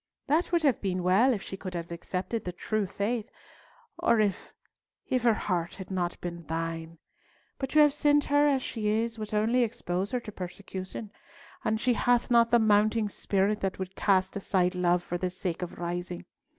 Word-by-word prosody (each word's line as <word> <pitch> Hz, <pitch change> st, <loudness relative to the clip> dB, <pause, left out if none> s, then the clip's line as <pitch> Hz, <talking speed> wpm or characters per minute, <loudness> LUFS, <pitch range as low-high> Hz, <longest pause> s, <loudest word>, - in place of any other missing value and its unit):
That 315 Hz, +5 st, +1 dB
would 340 Hz, -2 st, +2 dB
have 275 Hz, -7 st, +3 dB
been 185 Hz, -2 st, -1 dB
well 195 Hz, +9 st, +5 dB
if 210 Hz, -6 st, -2 dB
she -, -, -6 dB
could 185 Hz, -1 st, -7 dB
have 170 Hz, 0 st, -5 dB
accepted 185 Hz, +5 st, -3 dB
the 180 Hz, -, -3 dB
true 210 Hz, +3 st, -2 dB
faith, 215 Hz, +4 st, -2 dB, 0.7 s
or 235 Hz, -1 st, +3 dB
if—if 215 Hz, +4 st, -3 dB
her 230 Hz, -2 st, +4 dB
heart 175 Hz, -5 st, -2 dB
had 190 Hz, 0 st, -9 dB
not 175 Hz, -2 st, -2 dB
been 170 Hz, -1 st, -5 dB
thine; 165 Hz, 0 st, -4 dB, 0.6 s
but 270 Hz, -, -2 dB
to 305 Hz, -, +3 dB
have 295 Hz, -1 st, +6 dB
sent 295 Hz, 0 st, +3 dB
her 290 Hz, +1 st, +3 dB
as 270 Hz, -3 st, +2 dB
she 215 Hz, -3 st, -3 dB
is 225 Hz, +2 st, 0 dB
would 215 Hz, -1 st, -5 dB
only 220 Hz, +4 st, +2 dB
expose 195 Hz, -4 st, -1 dB
her 250 Hz, -, -1 dB
to 215 Hz, -, -8 dB
persecution, 190 Hz, +2 st, -7 dB, 0.5 s
and 220 Hz, 0 st, 0 dB
she 250 Hz, +2 st, +2 dB
hath 245 Hz, +1 st, +2 dB
not 235 Hz, -1 st, +5 dB
the 240 Hz, -, +5 dB
mounting 215 Hz, 0 st, +3 dB
spirit 200 Hz, +1 st, 0 dB
that 195 Hz, -1 st, -1 dB
would 190 Hz, 0 st, -6 dB
cast 190 Hz, -2 st, +2 dB
aside 190 Hz, -2 st, +1 dB
love 180 Hz, -1 st, +2 dB
for 175 Hz, 0 st, -3 dB
the 185 Hz, -, -1 dB
sake 180 Hz, -1 st, -4 dB
of 180 Hz, -, -5 dB
rising. 175 Hz, +1 st, -4 dB
200 Hz, 190 wpm, -28 LUFS, 180-235 Hz, 0.7 s, have